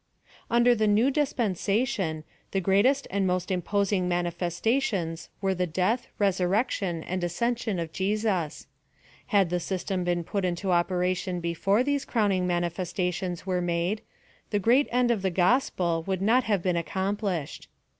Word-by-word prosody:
Under 240 Hz, +1 st, +5 dB
the 215 Hz, -2 st, +1 dB
New 220 Hz, +6 st, +4 dB
Dispensation, 215 Hz, -, 0 dB, 0.3 s
the 195 Hz, -, 0 dB
greatest 205 Hz, +10 st, +3 dB
and 195 Hz, -1 st, +1 dB
most 180 Hz, +1 st, -1 dB
imposing 190 Hz, +1 st, 0 dB
manifestations 175 Hz, +1 st, -1 dB
were 195 Hz, -1 st, +1 dB
the 180 Hz, -1 st, -1 dB
death, 185 Hz, +9 st, 0 dB
resur 190 Hz, -3 st, +2 dB
rection 195 Hz, -6 st, 0 dB
and 185 Hz, 0 st, -3 dB
ascension 225 Hz, +4 st, -1 dB
of 165 Hz, -1 st, -4 dB
Jesus: 195 Hz, -5 st, -1 dB, 0.6 s
had 200 Hz, -6 st, +2 dB
the 180 Hz, -, +1 dB
system 185 Hz, +1 st, -2 dB
been 175 Hz, -1 st, 0 dB
put 200 Hz, +3 st, -2 dB
into 180 Hz, +1 st, -1 dB
operation 180 Hz, +1 st, 0 dB
before 185 Hz, +6 st, +1 dB
these 285 Hz, 0 st, 0 dB
crowning 200 Hz, -6 st, +1 dB
mani 175 Hz, -1 st, +1 dB
festations 180 Hz, 0 st, -3 dB
were 185 Hz, -2 st, 0 dB
made, 175 Hz, +4 st, -1 dB, 0.5 s
the 205 Hz, -, +1 dB
great 240 Hz, +8 st, +3 dB
end 245 Hz, 0 st, +3 dB
of 220 Hz, -4 st, 0 dB
the 190 Hz, -, +1 dB
gospel 175 Hz, -3 st, +1 dB
would 190 Hz, -2 st, 0 dB
not 230 Hz, +6 st, +3 dB
have 205 Hz, -5 st, 0 dB
been 180 Hz, -2 st, +1 dB
accomplished. 190 Hz, -1 st, -2 dB
190 Hz, 145 wpm, -27 LUFS, 175-215 Hz, 0.6 s, Under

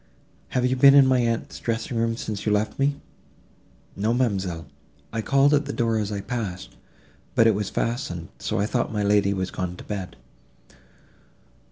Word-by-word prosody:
"Have 125 Hz, -1 st, 0 dB
you 130 Hz, +1 st, +2 dB
been 140 Hz, +2 st, +7 dB
in 140 Hz, -1 st, +8 dB
my 130 Hz, -1 st, +3 dB
aunt's 115 Hz, -1 st, -1 dB
dressing 115 Hz, +1 st, -3 dB
room, 115 Hz, 0 st, 0 dB
since 105 Hz, -3 st, -4 dB
you 105 Hz, -, 0 dB
left 105 Hz, +3 st, 0 dB
me?" 140 Hz, +1 st, +2 dB, 1.0 s
"No, 110 Hz, +4 st, 0 dB
ma'amselle, 95 Hz, -, -1 dB, 0.5 s
I 115 Hz, -, -1 dB
called 140 Hz, +6 st, +3 dB
at 145 Hz, 0 st, +2 dB
the 140 Hz, -, -3 dB
door 115 Hz, -2 st, +1 dB
as 105 Hz, -1 st, -2 dB
I 100 Hz, -1 st, -3 dB
passed, 100 Hz, -6 st, -5 dB, 0.6 s
but 115 Hz, -, +5 dB
it 115 Hz, -, +5 dB
was 100 Hz, -1 st, -2 dB
fastened; 115 Hz, -9 st, -3 dB
so -, -, -2 dB
I 100 Hz, -, +1 dB
thought 120 Hz, +2 st, -1 dB
my 105 Hz, -1 st, -1 dB
lady 100 Hz, -1 st, +3 dB
was 95 Hz, -2 st, -2 dB
gone 90 Hz, -1 st, -4 dB
to -, -, -11 dB
bed." 100 Hz, -3 st, -5 dB
110 Hz, 180 wpm, -24 LUFS, 100-125 Hz, 1.0 s, in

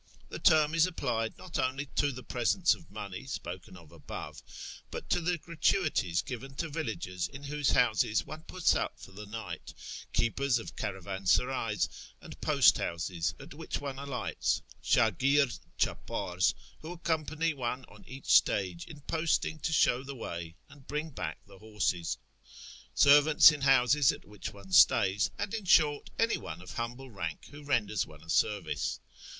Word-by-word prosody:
The -, -, -6 dB
term 155 Hz, -3 st, +5 dB
is 165 Hz, +1 st, +4 dB
applied 120 Hz, -10 st, -2 dB
not 185 Hz, -, -5 dB
only 135 Hz, +3 st, -1 dB
to 145 Hz, -1 st, +3 dB
the 125 Hz, -1 st, -9 dB
presents 125 Hz, -, +2 dB
of 85 Hz, -, -12 dB
money 100 Hz, +4 st, -7 dB
spoken 90 Hz, -5 st, -7 dB
of 80 Hz, -4 st, -16 dB
above, -, -, -8 dB, 0.5 s
but -, -, -7 dB
to -, -, +2 dB
the 175 Hz, +1 st, 0 dB
gratuities 155 Hz, -, 0 dB
given 135 Hz, +2 st, -7 dB
to 165 Hz, +3 st, -3 dB
villagers 110 Hz, -, -3 dB
in 135 Hz, +1 st, -11 dB
whose 145 Hz, 0 st, -1 dB
houses 110 Hz, -3 st, +2 dB
one 155 Hz, 0 st, -8 dB
puts 185 Hz, -2 st, +2 dB
up -, -, -2 dB
for -, -, -12 dB
the 105 Hz, +2 st, -9 dB
night, 105 Hz, -6 st, -7 dB, 0.4 s
keepers 120 Hz, +2 st, +1 dB
of 115 Hz, -, -7 dB
caravansarays 100 Hz, +4 st, 0 dB, 0.3 s
and -, -, -12 dB
post -, -, +5 dB
houses 85 Hz, 0 st, -2 dB
at -, -, -11 dB
which -, -, -5 dB
one 140 Hz, -2 st, -5 dB
alights, 135 Hz, -5 st, -2 dB, 0.2 s
8Muj%rd 125 Hz, -, +2 dB
cli{i'pars 90 Hz, 0 st, 0 dB, 0.2 s
who 160 Hz, +3 st, -7 dB
accompany 160 Hz, -1 st, -1 dB
one 130 Hz, -1 st, -3 dB
on -, -, -16 dB
each 135 Hz, -4 st, -10 dB
stage 90 Hz, -4 st, +3 dB
in 150 Hz, -2 st, -11 dB
posting 160 Hz, +1 st, 0 dB
to 160 Hz, -, -2 dB
show 130 Hz, -4 st, +3 dB
the 140 Hz, +1 st, -8 dB
way 85 Hz, -8 st, -6 dB
and 140 Hz, -2 st, -17 dB
bring 150 Hz, +2 st, -3 dB
back 80 Hz, -, -4 dB
the 100 Hz, -1 st, -16 dB
horses, 105 Hz, -6 st, -1 dB, 0.8 s
servants 145 Hz, +2 st, +8 dB
in 150 Hz, -2 st, -5 dB
houses 135 Hz, 0 st, +5 dB
at -, -, -10 dB
which 105 Hz, -1 st, -7 dB
one 100 Hz, -1 st, -14 dB
stays, 95 Hz, +2 st, +5 dB
and, 205 Hz, -, -3 dB
in 220 Hz, -3 st, -3 dB
short, 150 Hz, -5 st, +4 dB
any 230 Hz, 0 st, +2 dB
one 80 Hz, +2 st, -7 dB
of 90 Hz, -, -9 dB
humble 120 Hz, +3 st, -5 dB
rank 85 Hz, -6 st, -5 dB
who 145 Hz, 0 st, -11 dB
renders 110 Hz, -8 st, 0 dB
one 75 Hz, -1 st, -14 dB
a 80 Hz, -, -17 dB
service. 105 Hz, +3 st, 0 dB
125 Hz, 160 wpm, -30 LUFS, 100-150 Hz, 0.8 s, servants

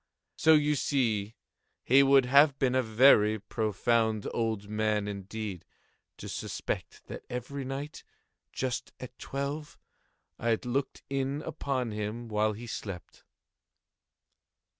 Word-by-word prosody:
So 160 Hz, 0 st, +5 dB
you 150 Hz, 0 st, +3 dB
see 115 Hz, -7 st, 0 dB, 0.5 s
he 135 Hz, +3 st, +6 dB
would 135 Hz, -1 st, +5 dB
have 140 Hz, +2 st, +5 dB
been 130 Hz, -2 st, +1 dB
a 130 Hz, -, +3 dB
very 110 Hz, -2 st, +5 dB
profound 110 Hz, +1 st, 0 dB
old 110 Hz, -3 st, -1 dB
man, 105 Hz, -1 st, 0 dB
indeed, 100 Hz, -1 st, -5 dB, 0.5 s
to -, -, -8 dB
suspect -, -, -5 dB
that -, -, -8 dB
every 125 Hz, +3 st, -5 dB
night, 135 Hz, +3 st, -6 dB, 0.5 s
just 130 Hz, -2 st, -3 dB
at 125 Hz, -1 st, -9 dB
twelve, 140 Hz, +2 st, -4 dB, 0.6 s
I 115 Hz, 0 st, +2 dB
looked 130 Hz, +3 st, -2 dB
in 135 Hz, +2 st, -2 dB
upon 135 Hz, -6 st, -2 dB
him 105 Hz, +3 st, -4 dB
while 105 Hz, 0 st, +1 dB
he 115 Hz, +3 st, -8 dB
slept. 100 Hz, -6 st, -7 dB
120 Hz, 120 wpm, -29 LUFS, 110-135 Hz, 0.6 s, he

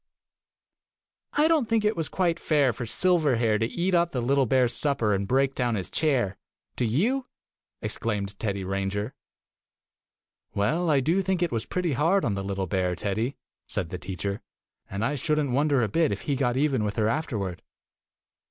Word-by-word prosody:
"I 300 Hz, +2 st, +4 dB
don't 310 Hz, -8 st, +2 dB
think 225 Hz, -2 st, +2 dB
it 210 Hz, -, +2 dB
was 160 Hz, -2 st, -1 dB
quite 170 Hz, -2 st, 0 dB
fair 145 Hz, -5 st, +2 dB
for 120 Hz, -, -5 dB
Silverhair 130 Hz, -10 st, +2 dB
to 115 Hz, -, +1 dB
eat 180 Hz, +8 st, -1 dB
up 170 Hz, -1 st, +3 dB
the 130 Hz, -, -3 dB
little 135 Hz, +2 st, +2 dB
bear's 125 Hz, -1 st, +3 dB
supper 130 Hz, -8 st, +1 dB
and 100 Hz, 0 st, -1 dB
break 135 Hz, +3 st, +2 dB
down 120 Hz, -3 st, 0 dB
his 95 Hz, -4 st, -4 dB
chair. 130 Hz, -11 st, +1 dB, 0.4 s
Do 125 Hz, -, 0 dB
you?" 230 Hz, -, +1 dB, 0.6 s
exclaimed 100 Hz, -3 st, -3 dB
Teddy 100 Hz, -3 st, -2 dB
Ranger. 100 Hz, +4 st, -2 dB, 1.4 s
"Well, 160 Hz, +13 st, +1 dB
I 140 Hz, -3 st, +4 dB
do 165 Hz, +8 st, +2 dB
think 190 Hz, -2 st, 0 dB
it 170 Hz, -, 0 dB
was 115 Hz, -1 st, -2 dB
pretty 180 Hz, -4 st, -1 dB
hard 165 Hz, +9 st, +2 dB
on 105 Hz, -, +1 dB
the 100 Hz, 0 st, -3 dB
little 95 Hz, -1 st, -2 dB
bear, 90 Hz, 0 st, 0 dB
Teddy," 110 Hz, +8 st, -2 dB, 0.3 s
said 85 Hz, -, -3 dB
the 90 Hz, -, -4 dB
teacher, 100 Hz, +2 st, -4 dB, 0.5 s
"and 100 Hz, +4 st, -2 dB
I 140 Hz, -, 0 dB
should 150 Hz, +2 st, 0 dB
n't 145 Hz, -3 st, 0 dB
wonder 140 Hz, -1 st, +2 dB
a -, -, +2 dB
bit 160 Hz, +9 st, +2 dB
if -, -, -3 dB
he 140 Hz, -, -1 dB
got 125 Hz, -2 st, 0 dB
even 135 Hz, -5 st, +2 dB
with 105 Hz, -1 st, -2 dB
her 110 Hz, -2 st, +2 dB
afterward. 110 Hz, -, -2 dB
125 Hz, 180 wpm, -26 LUFS, 105-160 Hz, 1.4 s, I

